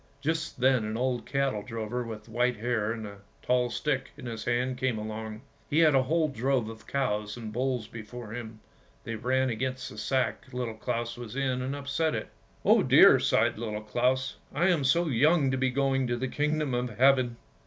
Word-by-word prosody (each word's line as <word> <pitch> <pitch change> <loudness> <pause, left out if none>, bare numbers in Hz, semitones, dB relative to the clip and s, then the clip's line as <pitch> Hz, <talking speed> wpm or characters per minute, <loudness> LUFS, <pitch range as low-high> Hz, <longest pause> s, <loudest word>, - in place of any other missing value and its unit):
Just 155 0 -2
then 130 -3 +4
an 110 +1 -3
old 125 0 -1
cattle 135 -6 0
drover 115 +3 -4
with 110 -2 -8
white 120 +2 +1
hair 110 -1 0
and 115 -1 -5
a 100 -1 -9 0.3
tall 125 -1 +2
stick 135 0 -1
in 140 - -9
his 115 -3 -5
hand 125 +1 0
came 130 -3 0
along. 110 0 -5 0.3
He 145 - 0
had 160 -2 +6
a 135 - +5
whole 160 +4 +1
drove 130 -3 0
of 110 0 -11
cows 105 -6 -1
and 110 -2 -7
bulls 125 -2 -1
before 115 0 -9
him; 115 -2 -7 0.4
they 115 - -5
ran 130 +3 +1
against 130 +2 -3
the 105 - -8
sack 130 +2 -1
Little 125 -3 -3
Claus 120 +1 -3
was 120 -1 -8
in, 130 -2 0
and 130 +2 -3
upset 145 +3 -1
it. - - -4 0.4
"Oh - - +6
dear!" - - +7
sighed - - +2
Little 105 -2 -4
Claus; 125 +4 0 0.2
"I 175 +2 +3
am 165 -6 +2
so 170 +6 +3
young 145 +1 +3
to 130 - 0
be 130 0 +2
going 135 0 +1
to 120 0 -1
the 130 +2 -2
Kingdom 150 0 0
of 125 0 -2
Heaven! 130 -2 +4
125 Hz, 195 wpm, -28 LUFS, 115-135 Hz, 0.4 s, dear